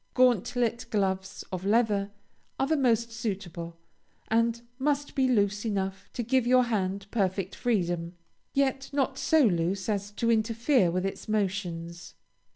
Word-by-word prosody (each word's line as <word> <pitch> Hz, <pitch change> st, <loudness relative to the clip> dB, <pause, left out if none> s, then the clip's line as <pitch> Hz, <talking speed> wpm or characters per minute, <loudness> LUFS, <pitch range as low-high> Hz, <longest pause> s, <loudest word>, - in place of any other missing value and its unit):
Gauntlet 245 Hz, -1 st, +2 dB
gloves, 190 Hz, -2 st, -1 dB
of 185 Hz, -1 st, -4 dB
leather, 205 Hz, -1 st, +2 dB, 0.5 s
are 270 Hz, -, +3 dB
the 315 Hz, +3 st, +1 dB
most 235 Hz, -4 st, +2 dB
suitable, 185 Hz, -7 st, -5 dB, 0.5 s
and 230 Hz, +1 st, +1 dB, 0.2 s
must 290 Hz, +1 st, 0 dB
be 265 Hz, -1 st, +2 dB
loose 205 Hz, -4 st, +2 dB
enough 195 Hz, -3 st, -3 dB
to 240 Hz, -, -2 dB
give 245 Hz, +1 st, +1 dB
your 255 Hz, 0 st, +5 dB
hand 200 Hz, -4 st, -1 dB
perfect 195 Hz, -3 st, 0 dB
freedom, 175 Hz, -7 st, -1 dB, 0.4 s
yet 270 Hz, -1 st, 0 dB
not 275 Hz, -1 st, 0 dB
so 320 Hz, -2 st, +4 dB
loose 185 Hz, -2 st, +1 dB
as 205 Hz, -2 st, -1 dB
to 230 Hz, +2 st, +1 dB
interfere 230 Hz, -, +2 dB
with 185 Hz, +2 st, -1 dB
its 195 Hz, -, -5 dB
motions. 175 Hz, -5 st, -3 dB
215 Hz, 140 wpm, -28 LUFS, 190-245 Hz, 0.5 s, your